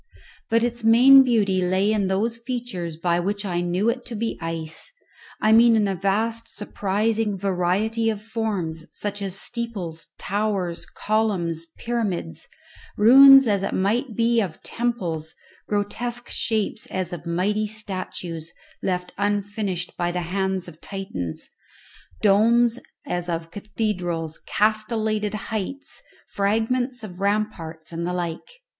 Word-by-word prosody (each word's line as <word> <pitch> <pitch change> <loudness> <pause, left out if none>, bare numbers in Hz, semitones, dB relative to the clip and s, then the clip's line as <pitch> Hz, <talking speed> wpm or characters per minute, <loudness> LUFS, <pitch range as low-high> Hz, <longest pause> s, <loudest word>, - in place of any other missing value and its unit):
But 230 +1 +3
its 240 -1 -2
main 250 +5 +8
beauty 210 -7 +2
lay 185 +3 +2
in 205 -3 +1
those 225 +5 0
features 235 -10 -4
by 170 +1 +1
which 200 +3 -2
I 175 -2 -1
knew 175 +4 0
it 245 +2 0
to 240 - -5
be 225 +1 -2
ice 165 - -4 0.5
I 215 - +3
mean 230 +1 +7
in 210 -2 +3
a 195 - 0
vast 220 +5 0
surprising 210 +1 -1
variety 200 +4 0
of 215 -2 -2
forms, 195 -8 -3
such 205 0 -3
as 195 -1 -3
steeples, 200 -9 -4
towers, 200 -4 -2
columns, 185 -7 -1
pyramids, 215 - -3 0.5
ruins 270 +4 +9
as 200 -3 +2
it 195 - -2
might 220 +5 0
be 230 +1 +3
of 180 -6 -5
temples, 175 -10 -2 0.3
grotesque 240 +4 -2
shapes 220 0 -1
as 185 -2 -3
of 170 0 -7
mighty 205 +5 0
statues, 185 -6 -5 0.3
left 180 -1 -2
unfinished 205 -3 -2
by 175 0 0
the 180 0 -2
hands 190 +1 -1
of 165 -2 -13
Titans, 140 - -5 0.8
domes 230 +4 +4 0.3
as 175 0 -3
of 165 -1 -3
cathedrals, 180 -6 -3
castellated 215 0 0
heights, 220 +6 -5 0.3
fragments 225 +4 0
of 185 -4 -8
ramparts, 195 -6 -2
and 170 +1 -3
the 180 - -2
like. 170 -2 -3
205 Hz, 130 wpm, -24 LUFS, 180-225 Hz, 0.8 s, ruins